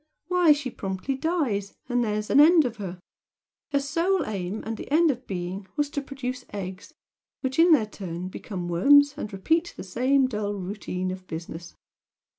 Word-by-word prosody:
Why 360 -3 +5
she 285 -4 +1
promptly 190 +7 -3
dies, 265 - -1
and 245 -1 +1
there's 210 -1 -2
an - - +6
end 315 0 +7
of 235 -2 -3
her! 185 -3 -6 0.7
Her 280 - +3
sole 335 +6 0
aim 195 0 -4
and 220 0 -4
end 325 +1 +5
of 250 0 -8
being 185 +1 -4
was 290 -1 0
to 285 - -2
produce 255 -2 -5
eggs, 195 +8 -7 0.5
which 265 +2 -2
in 340 +1 +7
their 270 -9 +5
turn 180 -4 -6
become 185 -1 -6
worms 285 +12 +5
and 220 -8 -5
repeat 320 - 0
the - - -6
same 255 +8 +2
dull 210 -4 -3
routine 185 -1 -4
of 185 0 -8
business. 165 +1 -7
230 Hz, 170 wpm, -26 LUFS, 190-285 Hz, 0.7 s, end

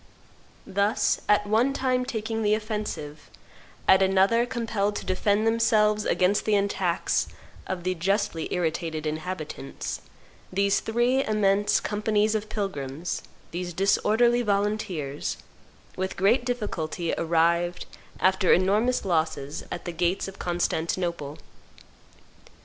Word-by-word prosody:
Thus, 200 +2 +1
at 210 0 +4
one 225 +6 +2
time 255 -2 0
taking 225 -2 -3
the 210 0 +3
offensive, 210 -9 -5 0.6
at 190 0 +6
another 195 +5 +3
compelled 220 -4 -1
to - - -5
defend 205 +3 +1
themselves 215 -2 +3
against 190 +3 +2
the 215 - +3
attacks 190 -3 0 0.4
of 185 -2 -4
the 185 0 0
justly 185 -2 -1
irritated 160 -2 -2
inhabitants, 155 -2 -5 0.5
these 200 +1 +2
three 240 +4 +1
immense 205 -1 +2
companies 210 0 +1
of 215 -1 -2
pilgrims, 165 -6 -3 0.3
these 175 0 -4
disorderly 215 +6 +3
volunteers, 200 - -1 0.6
with 190 0 -3
great 205 +7 +3
difficulty 180 -8 -2
arrived, 170 +2 +1 0.3
after 190 -1 +3
enormous 210 +8 +3
losses, 160 -5 -1
at 175 - -5
the 175 - -3
gates 175 +3 0
of 195 - -10
Constantinople. 170 -3 -2
195 Hz, 110 wpm, -26 LUFS, 175-215 Hz, 0.6 s, at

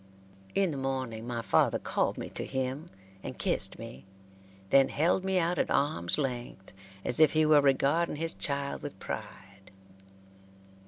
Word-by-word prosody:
In 195 -3 +2
the 140 - -5
morning 130 -4 -3
my 120 -1 -3
father - - +2
called - - -1
me - - -6
to - - -4
him 130 +4 -3 0.3
and - - -7
kissed - - 0
me, 65 - -10 0.7
then 135 -1 +5
held 170 +5 +1
me 190 0 0
out 175 -1 +1
at - - 0
arms' 85 -12 +1
length 120 -9 -4 0.3
as 125 - +5
if 155 - +6
he 155 0 +3
were 150 -1 +6
regarding 140 +5 +2
his 165 +2 -1
child 140 -1 -2
with 145 -8 -7
pride. 95 0 -8
140 Hz, 155 wpm, -29 LUFS, 120-155 Hz, 0.7 s, if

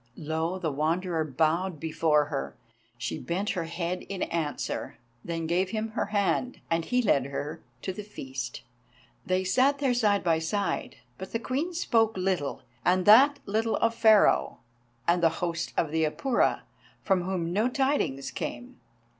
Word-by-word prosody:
Low 160 +3 -2
the 170 -5 -2
Wanderer 165 +3 0
bowed 160 +4 0
before 155 -1 +2
her. 145 -2 -4 0.4
She - - -4
bent 190 +5 -2
her 175 -4 -2
head 170 +2 -3
in 195 -2 -2
answer, 160 -3 -3 0.3
then 165 -1 -3
gave 180 +3 +1
him 220 +2 -2
her 215 - -2
hand, 210 +5 0
and 165 0 +2
he 250 +7 +1
led 140 - +2
her 140 +2 -5 0.2
to 190 - -2
the 210 - -6
feast. 130 - -6 0.6
They 185 0 +1
sat 260 +9 +3
there 275 -3 +1
side 210 -4 +2
by 165 -3 +2
side, 200 +5 -2 0.2
but 190 - -8
the 230 - 0
Queen 275 +9 -2
spoke 225 - +2
little, 185 -6 -1 0.2
and 180 0 +2
that 270 +7 +7
little 220 +2 0
of 230 0 +1
Pharaoh 215 - +4 0.5
and 170 +1 +3
the 165 - +5
host 170 -1 -2
of 155 - +1
the 160 0 +1
Apura, 240 - +1 0.4
from 190 -3 +2
whom 175 -3 -2
no 215 +6 +2
tidings 250 - 0
came. 250 +1 -6
185 Hz, 160 wpm, -28 LUFS, 160-220 Hz, 0.6 s, that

